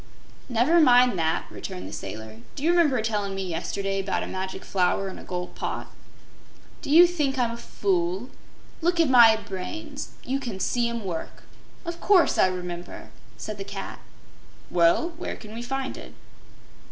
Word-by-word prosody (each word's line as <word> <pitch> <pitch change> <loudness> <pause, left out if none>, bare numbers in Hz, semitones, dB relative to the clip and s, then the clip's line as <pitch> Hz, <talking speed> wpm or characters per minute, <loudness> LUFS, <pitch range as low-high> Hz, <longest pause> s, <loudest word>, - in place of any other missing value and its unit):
"Never 255 +8 +4
mind 250 - +6
that," 160 0 0
returned 90 +1 -7
the 100 - -9
Sailor. 110 +2 -7 0.2
"Do - - -6
you 335 - +4
remember 320 -8 +3
tellin' 205 -3 -1
me 195 - -2
yesterday 195 +3 -2
'bout 195 - -1
a - - -3
Magic 190 0 -5
Flower 195 +1 +1
in - - -9
a - - -10
Gold 180 -1 -5
Pot?" - - -4 0.9
"Do - - -7
you 335 +4 +9
think 300 -6 0
I'm 240 -2 +1
a 235 - -6
fool? 190 +2 -1 0.5
Look 345 +1 +1
at 320 -5 +4
my 235 -3 +8
brains 225 - -6
you 270 +2 -1
can 235 -8 -5
see 235 +4 +1
'em 235 -1 -4
work. 170 -3 -5 0.4
Of 340 0 -5
course 385 -4 +4
I - - +6
remember!" 180 -1 -6 0.3
said 210 -1 -6
the - - -3
cat. 195 0 -7 0.7
"Well, 170 - +4
where - - -4
can 215 -1 -11
we 230 - -5
find 270 +2 -3
it?" - - -11
215 Hz, 170 wpm, -26 LUFS, 185-270 Hz, 0.9 s, you